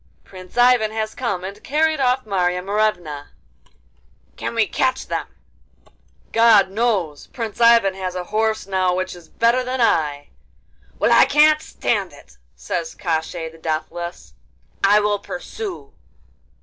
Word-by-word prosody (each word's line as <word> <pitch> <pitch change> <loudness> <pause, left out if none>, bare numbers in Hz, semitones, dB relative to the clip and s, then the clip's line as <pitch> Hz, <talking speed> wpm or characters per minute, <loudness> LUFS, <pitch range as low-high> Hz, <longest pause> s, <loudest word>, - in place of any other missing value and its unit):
'Prince 185 +2 -13
Ivan 245 -3 +4
has 220 0 -3
come 200 -8 -3
and 200 +2 -8
carried 310 +2 +1
off 255 -1 +1
Marya 180 -3 0
Morevna.' 180 -8 -1 1.1
'Can - - -5
we 225 -1 +3
catch 260 +4 -1
them?' - - -3 1.0
'God 220 -4 +5
knows! 195 -9 -1
Prince 230 -2 -6
Ivan 230 -4 +5
has 185 -1 -5
a 180 - -3
horse 220 +3 -1
now 185 -2 0
which 185 0 -3
is 175 -2 -15
better 235 +2 +2
than 255 +1 -3
I.' 150 -10 +1 0.7
'Well, - - +2
I - - +7
can't 305 +1 +4
stand 200 - -2
it,' 70 - -18 0.2
says 160 - -4
Koshchei 160 -1 -3
the 165 0 -17
Deathless. 170 +2 -5 0.5
'I 205 +2 +5
will 205 0 0
pursue. 365 - -7
200 Hz, 135 wpm, -21 LUFS, 180-235 Hz, 1.1 s, I